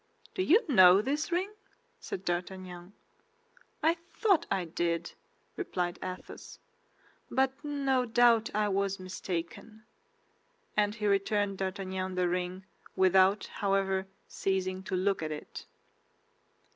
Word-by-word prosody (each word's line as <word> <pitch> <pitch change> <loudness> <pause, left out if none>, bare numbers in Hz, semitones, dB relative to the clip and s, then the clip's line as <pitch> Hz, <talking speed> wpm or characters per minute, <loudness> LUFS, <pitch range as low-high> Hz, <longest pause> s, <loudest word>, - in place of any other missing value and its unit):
"Do 375 - -2
you 395 +6 +4
know 190 - +7
this 285 - -1
ring?" 370 +4 0 0.5
said 195 - -6
D'Artagnan. 180 +1 -4 0.9
"I 330 +2 +3 0.2
thought 385 -7 +2
I 190 -2 0
did," 170 0 -2 0.4
replied 180 - -3
Athos; 185 0 -8 0.7
"but 265 0 +2
no 275 -3 0
doubt 230 -1 +4
I 210 0 +2
was 195 -1 0
mistaken." 185 +4 -6 0.9
And 210 0 +2
he 215 -2 -4
returned 200 0 +1
D'Artagnan 190 -1 -3
the 180 -1 +1
ring 180 +1 -3 0.3
without, 190 +2 +4
however, 195 -1 0 0.2
ceasing 190 -1 -2
to 190 - -2
look 190 0 +1
at 155 -1 -3
it. 150 - -8
195 Hz, 115 wpm, -30 LUFS, 185-230 Hz, 0.9 s, know